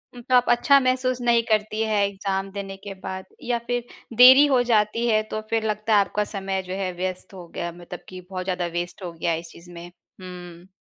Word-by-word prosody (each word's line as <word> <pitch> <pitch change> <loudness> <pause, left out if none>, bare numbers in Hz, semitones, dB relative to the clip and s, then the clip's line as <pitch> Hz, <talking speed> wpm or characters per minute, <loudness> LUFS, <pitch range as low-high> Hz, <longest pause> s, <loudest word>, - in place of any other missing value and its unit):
उम, 240 - -9
तो 255 +2 +1
आप 245 - +5
अच्छा 275 +3 +5
महसूस 255 -1 0
नहीं 235 -1 +3
करती 215 0 0
हैं 210 -2 +1
एग्ज़ाम 195 -1 -3
देने 195 -1 -6
के 200 -1 -6
बाद 190 0 -5 0.2
या 240 -1 0
फिर 245 -1 -1 0.3
देरी 260 +3 +9
हो 260 -3 +3
जाती 230 0 +1
है 215 -1 +3
तो 215 - -3
फिर 225 -1 0
लगता 215 +1 -1
है - - +6
आपका 210 - -1
समय 195 -2 -3
जो 185 - -4
है 190 -2 -2
व्यस्त 185 +1 -4
हो 180 -2 -10
गया 170 0 -3
मतलब 175 +1 -10
कि 185 -1 -9
बहुत 185 -1 -4
ज़्यादा 180 -1 -2
वेस्ट 175 +2 -7
हो 175 - -5
गया 170 +1 -2
है 165 - -1
इस 165 0 -11
चीज़ 175 +1 -15
में। 170 0 -9 0.3
हुँ। 180 -1 -10
200 Hz, 225 wpm, -24 LUFS, 185-235 Hz, 0.3 s, देरी